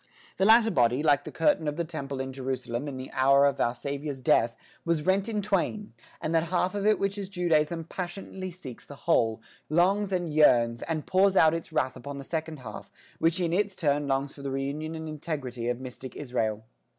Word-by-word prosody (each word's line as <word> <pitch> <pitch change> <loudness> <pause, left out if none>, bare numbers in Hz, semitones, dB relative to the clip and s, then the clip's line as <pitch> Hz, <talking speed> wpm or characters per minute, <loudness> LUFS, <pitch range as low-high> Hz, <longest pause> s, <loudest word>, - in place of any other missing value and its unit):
The 190 - +2
latter 225 +1 +6
body, 125 - +2
like 145 -2 +3
the - - -6
curtain 290 - +2
of 145 - -1
the 170 - -1
temple 140 -5 -5
in 130 0 -4
Jerusalem 130 0 -3
in 135 -2 -5
the 130 0 -7
hour 140 +1 +5
of 140 - +1
our 120 +1 +1
Saviour's 140 +2 -4
death, 115 -2 +3 0.3
was 165 -3 0
rent 190 +3 +2
in 210 -2 -1
twain, 205 - -1 0.3
and 155 - -2
that 165 0 +3
half 180 +2 0
of 205 0 -1
it 215 - +5
which 200 +1 -1
is 195 -2 -5
Judaism 165 -3 +1
passionately 185 +2 -6
seeks 155 -9 -10
the 145 - -11
whole, 115 -9 +2 0.3
longs 190 +5 +2
and 175 -4 -1
yearns, 120 -6 +4
and 160 -2 -3
pours 190 +1 +3
out 160 0 +6
its 165 0 -4
wrath 130 -1 0
upon 140 +2 -7
the 140 - -6
second 160 -1 -4
half, 110 -4 -9 0.3
which 165 +2 +2
in 170 -2 0
its 200 +1 +1
turn 145 -3 +1
longs 135 0 0
for 140 - -12
the 140 - -3
reunion 140 +4 -3
and 160 0 -6
the - - -5
integrity 140 -6 -4
of 120 0 -1
mystic 130 0 -8
Israel. 110 -6 -2
150 Hz, 210 wpm, -28 LUFS, 135-180 Hz, 0.3 s, latter